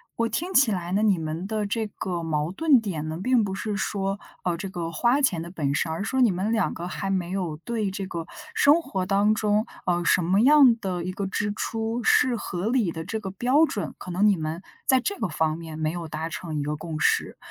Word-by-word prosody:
我 230 Hz, -, +1 dB
听 350 Hz, +10 st, -3 dB
起 265 Hz, -8 st, +5 dB
来 180 Hz, -3 st, -3 dB
呢， 210 Hz, +2 st, +2 dB
你 200 Hz, -5 st, +3 dB
们 160 Hz, +3 st, -4 dB
的 210 Hz, -1 st, -2 dB
这 220 Hz, +1 st, -1 dB
个 180 Hz, -4 st, -4 dB
矛 155 Hz, 0 st, -1 dB
盾 280 Hz, +1 st, +4 dB
点 160 Hz, -8 st, -4 dB
呢， 160 Hz, +1 st, -4 dB
并 250 Hz, -2 st, +3 dB
不 195 Hz, -2 st, -2 dB
是 205 Hz, +1 st, -3 dB
说， 195 Hz, -1 st, -2 dB, 0.2 s
呃， 175 Hz, -2 st, 0 dB
这 195 Hz, +3 st, -5 dB
个 175 Hz, -3 st, -4 dB
花 240 Hz, -, +2 dB
钱 185 Hz, -, +2 dB
的 170 Hz, -, -9 dB
本 140 Hz, -6 st, -1 dB
身， 160 Hz, -, 0 dB
而 165 Hz, +5 st, -3 dB
是 -, -, -4 dB
说 260 Hz, -, +1 dB
你 235 Hz, -5 st, +5 dB
们 190 Hz, +5 st, -1 dB
两 220 Hz, -4 st, +1 dB
个 175 Hz, +1 st, -5 dB
还 195 Hz, +1 st, -3 dB
没 180 Hz, -2 st, -1 dB
有 180 Hz, -5 st, -2 dB
对 215 Hz, +3 st, -2 dB
这 195 Hz, 0 st, -4 dB
个 170 Hz, -3 st, -5 dB, 0.3 s
生 300 Hz, +4 st, +5 dB
活 195 Hz, -, -3 dB
当 205 Hz, +2 st, +3 dB
中， 215 Hz, +2 st, +1 dB, 0.2 s
呃， 175 Hz, -1 st, +1 dB
什 175 Hz, -, +3 dB
么 190 Hz, +5 st, +3 dB
样 270 Hz, -2 st, +7 dB
的 180 Hz, -4 st, -3 dB
一 185 Hz, -, -3 dB
个 195 Hz, +1 st, -3 dB
支 205 Hz, +2 st, -1 dB
出 225 Hz, +2 st, -2 dB
是 250 Hz, +1 st, +4 dB
合 195 Hz, -2 st, -3 dB
理 230 Hz, -7 st, +1 dB
的 160 Hz, 0 st, -6 dB
这 220 Hz, -, -3 dB
个 195 Hz, -3 st, -5 dB
标 255 Hz, +11 st, +3 dB
准， 205 Hz, -, -4 dB
可 180 Hz, -, -8 dB
能 185 Hz, +4 st, +2 dB
你 205 Hz, -, +5 dB
们 160 Hz, +2 st, -4 dB, 0.2 s
在 260 Hz, -, +5 dB
这 400 Hz, +10 st, -3 dB
个 -, -, 0 dB
方 155 Hz, 0 st, 0 dB
面 160 Hz, -1 st, -8 dB
没 155 Hz, 0 st, 0 dB
有 170 Hz, -1 st, -5 dB
达 155 Hz, +1 st, -4 dB
成 165 Hz, -1 st, -5 dB
一 145 Hz, -, -1 dB
个 150 Hz, +1 st, -2 dB
共 155 Hz, 0 st, -6 dB
识。 -, -, +1 dB
195 Hz, 265 characters per minute, -25 LUFS, 170-225 Hz, 0.3 s, 样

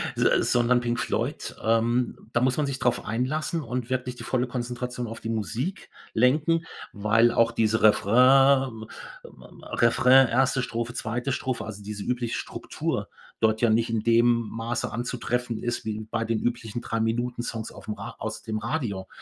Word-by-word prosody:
Se -, -, +3 dB
sondern 120 Hz, 0 st, +3 dB
Pink 120 Hz, 0 st, -1 dB
Floyd, -, -, -2 dB
ähm, 115 Hz, +1 st, 0 dB
da 120 Hz, -, +2 dB
muss 130 Hz, +1 st, +2 dB
man 150 Hz, -, +1 dB
sich 135 Hz, -2 st, -3 dB
drauf 125 Hz, -2 st, 0 dB
einlassen 155 Hz, +8 st, -1 dB
und 125 Hz, 0 st, -4 dB
wirklich 125 Hz, -1 st, -2 dB
die -, -, -8 dB
volle 125 Hz, -1 st, 0 dB
Konzentration 125 Hz, 0 st, -4 dB
auf 115 Hz, -, -8 dB
die 115 Hz, -, -5 dB
Musik 115 Hz, -, -3 dB, 0.2 s
lenken, 155 Hz, +7 st, +2 dB, 0.3 s
weil 115 Hz, +3 st, +3 dB
auch 115 Hz, 0 st, +3 dB
diese 110 Hz, -1 st, +1 dB
Refrain, 125 Hz, +2 st, +5 dB, 0.5 s
ma -, -, -16 dB
ma -, -, -14 dB
Refrain, 125 Hz, +2 st, +5 dB
1. 125 Hz, +2 st, +2 dB
Strophe, 120 Hz, +1 st, -3 dB
2. 120 Hz, +3 st, -3 dB
Strophe, 130 Hz, -2 st, -2 dB
also, 105 Hz, -2 st, -8 dB
diese 105 Hz, 0 st, -6 dB
übliche 120 Hz, -2 st, -2 dB
Struktur -, -, -4 dB, 0.3 s
dort 110 Hz, -1 st, +2 dB
ja 120 Hz, -, +4 dB
nicht 115 Hz, +2 st, +2 dB
in 115 Hz, -1 st, 0 dB
dem 115 Hz, +1 st, +4 dB, 0.3 s
Maße 115 Hz, +1 st, -3 dB
anzutreffen 120 Hz, 0 st, -2 dB
ist 120 Hz, -1 st, -2 dB
wie 110 Hz, 0 st, -3 dB
bei 115 Hz, -1 st, -1 dB
den 115 Hz, -1 st, 0 dB
üblichen 120 Hz, -1 st, -3 dB
Drei-Minuten-Songs 115 Hz, 0 st, -2 dB
auf'm 105 Hz, -1 st, -7 dB
Ra -, -, -7 dB
aus -, -, -5 dB
dem 110 Hz, -2 st, -3 dB
Radio. 105 Hz, -10 st, -3 dB
120 Hz, 165 wpm, -26 LUFS, 115-125 Hz, 0.5 s, Refrain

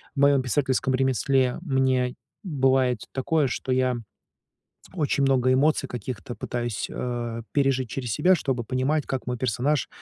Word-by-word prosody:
в 140 Hz, -, -3 dB
моём 140 Hz, -1 st, +5 dB
писательском 130 Hz, 0 st, 0 dB
ремесле 130 Hz, 0 st, +1 dB
мне 130 Hz, -5 st, +1 dB, 0.3 s
бывает 135 Hz, -, +2 dB
такое, 145 Hz, +2 st, +1 dB
что 130 Hz, +1 st, -3 dB
я 130 Hz, -1 st, +2 dB, 1.0 s
очень 150 Hz, -4 st, 0 dB
много 130 Hz, -2 st, +3 dB
эмоций 140 Hz, +2 st, +2 dB
каких-то 120 Hz, 0 st, -6 dB
пытаюсь, 120 Hz, -3 st, -3 dB
э, 120 Hz, -2 st, -4 dB
пережить 135 Hz, -3 st, +1 dB
через 120 Hz, 0 st, -4 dB
себя, 180 Hz, -, +4 dB
чтобы 135 Hz, -7 st, -2 dB
понимать, 130 Hz, +5 st, 0 dB
как 135 Hz, -2 st, -3 dB
мой 125 Hz, -, -1 dB
персонаж 130 Hz, +4 st, 0 dB
130 Hz, 140 wpm, -25 LUFS, 125-140 Hz, 1.0 s, моём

